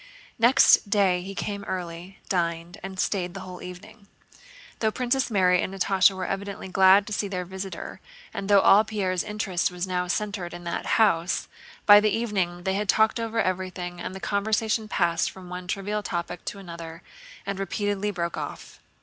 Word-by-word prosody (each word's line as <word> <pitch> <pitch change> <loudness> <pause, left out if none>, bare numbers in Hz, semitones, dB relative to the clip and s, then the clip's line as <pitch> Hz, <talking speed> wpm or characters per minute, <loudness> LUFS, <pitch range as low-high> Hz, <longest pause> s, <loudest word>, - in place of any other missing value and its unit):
Next 235 -3 +6
day 195 -4 +3
he 195 +2 -7
came 200 0 -4
early, 180 +1 -6
dined, 170 -1 -2
and 190 0 -7
stayed 180 -3 -1
the 195 - -6
whole 180 -1 -9
evening. 200 +4 -11 0.7
Though 220 - +2
Princess 255 +3 0
Mary 185 -4 +3
and - - -3
Natásha 195 0 +3
were 185 -1 -3
evidently 195 0 -4
glad 190 +2 +6
to 215 - -5
see 205 - -1
their 180 -2 -4
visitor 190 +1 -7 0.3
and 195 - -5
though 200 -1 +6
all 205 +3 +6
Pierre's 195 -5 -1
interest 210 -4 -1
was 180 0 -4
now 180 -1 -1
centered 190 -2 -3
in 175 - -9
that 170 0 -4
house, 185 -6 +2 0.4
by 205 0 +10
the 215 +1 +2
evening 190 -6 -1
they 190 - 0
had 205 0 -2
talked 220 +3 +3
over 230 0 -2
everything 185 -2 -2
and 185 - -5
the - - -6
conversation 215 +2 0
passed 170 -4 +1
from 185 -2 -12
one 180 0 -7
trivial 205 +3 -2
topic 175 -3 -4
to - - -4
another 170 -3 -9 0.4
and 200 -1 -3
repeatedly 205 +1 -1
broke 170 -4 -3
off. - - -7
190 Hz, 175 wpm, -26 LUFS, 180-205 Hz, 0.7 s, by